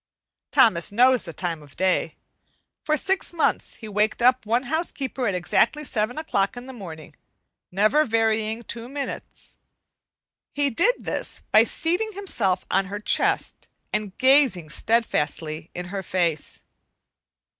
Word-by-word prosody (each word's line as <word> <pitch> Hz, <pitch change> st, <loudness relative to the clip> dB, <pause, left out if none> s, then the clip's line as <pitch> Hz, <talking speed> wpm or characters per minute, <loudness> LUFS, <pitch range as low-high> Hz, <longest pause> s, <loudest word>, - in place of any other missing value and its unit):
Thomas 170 Hz, -7 st, +3 dB
knows 250 Hz, +2 st, +4 dB
the 170 Hz, -, -6 dB
time 165 Hz, -1 st, -4 dB
of 145 Hz, -1 st, -16 dB
day. 185 Hz, 0 st, 0 dB, 0.7 s
For 305 Hz, 0 st, +1 dB
six 385 Hz, +6 st, +1 dB
months 330 Hz, -, 0 dB
he 220 Hz, -, -10 dB
waked 210 Hz, +1 st, 0 dB
up 250 Hz, -2 st, +3 dB
one 235 Hz, +3 st, +1 dB
housekeeper 275 Hz, -3 st, -2 dB
at 195 Hz, -, 0 dB
exactly 240 Hz, -, +1 dB
seven 240 Hz, -2 st, -2 dB
o'clock 220 Hz, -9 st, -1 dB
in 245 Hz, -, -8 dB
the 265 Hz, -, -9 dB
morning, 165 Hz, -9 st, -10 dB, 0.6 s
never 215 Hz, +11 st, +3 dB
varying 225 Hz, -1 st, 0 dB
two 235 Hz, +1 st, -6 dB
minutes. 280 Hz, 0 st, -7 dB, 1.0 s
He 285 Hz, -1 st, +1 dB
did -, -, +3 dB
this -, -, -2 dB
by -, -, +7 dB
seating 380 Hz, +7 st, -1 dB
himself 240 Hz, -, -1 dB
on 195 Hz, -, +2 dB
her 200 Hz, +2 st, -6 dB
chest 210 Hz, -, 0 dB, 0.3 s
and 210 Hz, -3 st, -3 dB
gazing 260 Hz, -, +4 dB
steadfastly 160 Hz, -6 st, 0 dB
in 180 Hz, 0 st, -5 dB
her 195 Hz, -, -2 dB
face. 170 Hz, -4 st, -2 dB
225 Hz, 135 wpm, -24 LUFS, 185-270 Hz, 1.0 s, by